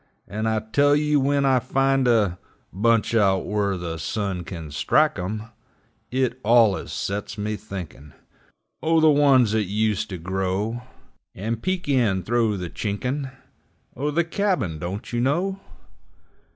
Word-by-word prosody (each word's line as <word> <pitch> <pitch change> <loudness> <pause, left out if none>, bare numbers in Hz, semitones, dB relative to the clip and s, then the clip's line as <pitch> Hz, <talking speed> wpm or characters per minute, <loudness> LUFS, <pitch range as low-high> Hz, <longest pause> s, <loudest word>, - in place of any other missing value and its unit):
And 110 +3 -2
I 110 -1 0
tell 145 +7 +3
you, 150 0 +2
when 140 +1 +2
I 130 -1 +4
find 135 +1 +1
a 105 -7 +2 0.3
Bunch 115 +4 +2
out 100 -4 +3
whur 100 -2 0
the 85 -2 -5
sun 100 -2 -3
kin 80 -4 -8
strike 150 - +2
'em, 105 +4 -3 0.7
It 130 -1 -1
allus 110 -6 +3
sets 100 +8 -4
me 105 +1 -2
thinkin' 90 -8 -9 0.7
O' 165 +1 +3
the 155 -1 +6
ones 135 -6 +4
'at 110 -3 +1
used 105 0 0
to 95 - -5
grow 95 +6 -2 0.5
And 115 +3 -3
peek 185 -2 -2
in 115 -9 +2
thro' 115 -3 +1
the 90 -1 -4
chinkin' 125 +7 -3 0.7
O' 145 +4 -1
the 165 +4 +1
cabin, 165 - -1
don't 95 +8 -6
you 120 - 0
know! 180 +9 0
110 Hz, 145 wpm, -23 LUFS, 95-135 Hz, 0.7 s, the